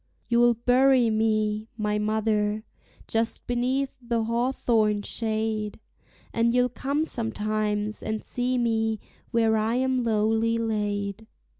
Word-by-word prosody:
You'll 240 Hz, 0 st, +4 dB
bury 250 Hz, 0 st, +4 dB
me, 215 Hz, -1 st, 0 dB
my 210 Hz, -1 st, 0 dB
mother, 215 Hz, 0 st, 0 dB, 0.4 s
just 225 Hz, 0 st, 0 dB
beneath 260 Hz, +3 st, -1 dB
the 235 Hz, -2 st, -1 dB
hawthorn 230 Hz, -3 st, +1 dB
shade, 220 Hz, -2 st, -2 dB, 0.5 s
And 235 Hz, +1 st, +2 dB
you'll 250 Hz, 0 st, +3 dB
come 280 Hz, +5 st, -1 dB
sometimes 215 Hz, -4 st, -1 dB
and 220 Hz, 0 st, -3 dB
see 250 Hz, +1 st, -1 dB
me 225 Hz, -2 st, 0 dB, 0.3 s
where 225 Hz, -2 st, +2 dB
I 220 Hz, +2 st, 0 dB
am 260 Hz, 0 st, +1 dB
lowly 225 Hz, +1 st, +1 dB
laid. 210 Hz, -1 st, -2 dB
225 Hz, 115 wpm, -26 LUFS, 215-240 Hz, 0.5 s, You'll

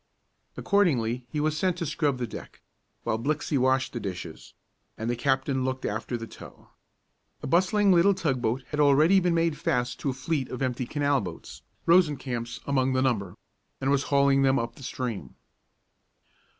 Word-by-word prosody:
Accordingly 125 Hz, -, +1 dB
he 150 Hz, -, -3 dB
was 155 Hz, +1 st, 0 dB
sent 180 Hz, +2 st, 0 dB
to 170 Hz, -, -3 dB
scrub 145 Hz, -2 st, 0 dB
the 125 Hz, -, -2 dB
deck, -, -, -10 dB, 0.4 s
while 110 Hz, -, -1 dB
Blixey 150 Hz, +4 st, -1 dB
washed 130 Hz, 0 st, +2 dB
the 120 Hz, -, -3 dB
dishes, 90 Hz, -5 st, -7 dB, 0.4 s
and 110 Hz, -, -4 dB
the -, -, -1 dB
captain 130 Hz, +1 st, 0 dB
looked 130 Hz, 0 st, -3 dB
after 115 Hz, +3 st, -3 dB
the 115 Hz, -, -6 dB
tow. -, -, -14 dB, 0.7 s
A -, -, -3 dB
bustling 190 Hz, +6 st, +3 dB
little 185 Hz, +3 st, +5 dB
tug 140 Hz, -9 st, -1 dB
boat 120 Hz, +3 st, -1 dB
had 150 Hz, -, -4 dB
already 150 Hz, +7 st, +5 dB
made 165 Hz, -3 st, +1 dB
fast 125 Hz, -7 st, -1 dB
to 140 Hz, -, -2 dB
a -, -, -1 dB
fleet 135 Hz, +1 st, -2 dB
of 130 Hz, +1 st, -4 dB
empty 125 Hz, -1 st, -2 dB
canal 145 Hz, -2 st, +1 dB
boats, -, -, -8 dB, 0.2 s
Rosencamp's 135 Hz, -9 st, +1 dB
among 135 Hz, -2 st, +1 dB
the 130 Hz, 0 st, +2 dB
number, 100 Hz, -8 st, -1 dB, 0.4 s
and 135 Hz, +1 st, 0 dB
was 140 Hz, -1 st, +2 dB
hauling 140 Hz, -1 st, +4 dB
them 135 Hz, 0 st, +3 dB
up 115 Hz, 0 st, -2 dB
the 135 Hz, -, -16 dB
stream. 125 Hz, -5 st, -5 dB
135 Hz, 170 wpm, -27 LUFS, 125-155 Hz, 0.7 s, little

